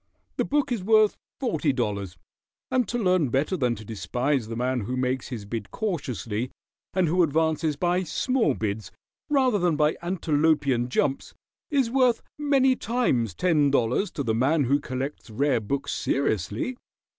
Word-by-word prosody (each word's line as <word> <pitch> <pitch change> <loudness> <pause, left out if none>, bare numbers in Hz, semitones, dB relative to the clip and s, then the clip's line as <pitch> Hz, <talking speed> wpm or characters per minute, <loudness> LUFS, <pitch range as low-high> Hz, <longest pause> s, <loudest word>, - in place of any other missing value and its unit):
The - - +1
book 290 -2 0
is 225 -6 -1
worth 215 0 +4 0.2
forty 165 - +1
dollars; 100 -8 -3 0.5
and 250 -4 +2
to 240 - -2
learn 185 - +2
better 140 +9 +1
than 125 -7 +1
to 110 0 -10
despise 120 +5 -1
the 115 - -5
man 125 +2 0
who 125 +5 -3
makes 130 0 -1
his 115 -5 -6
bid 105 -1 -5
cautiously, 125 - -3 0.5
and 185 -2 +3
who 180 +4 +2
advances 160 -1 +1
by 175 +4 +1
small 220 - +1
bids 105 -2 -3 0.4
rather 260 -7 +3
than 175 -3 +2
by 150 +1 +2
antelopian 150 -7 +1
jumps, 135 +1 -1 0.3
is 270 -6 +1
worth 250 -3 +3 0.2
many 270 -3 +3
times 225 - 0
ten 160 -6 +3
dollars 135 - +1
to 140 - -2
the 115 -3 0
man 140 +7 +2
who 140 +3 +2
collects 135 -1 -5
rare 130 +3 +1
books 135 +6 -3
seriously. 110 - -1
145 Hz, 155 wpm, -26 LUFS, 120-190 Hz, 0.5 s, worth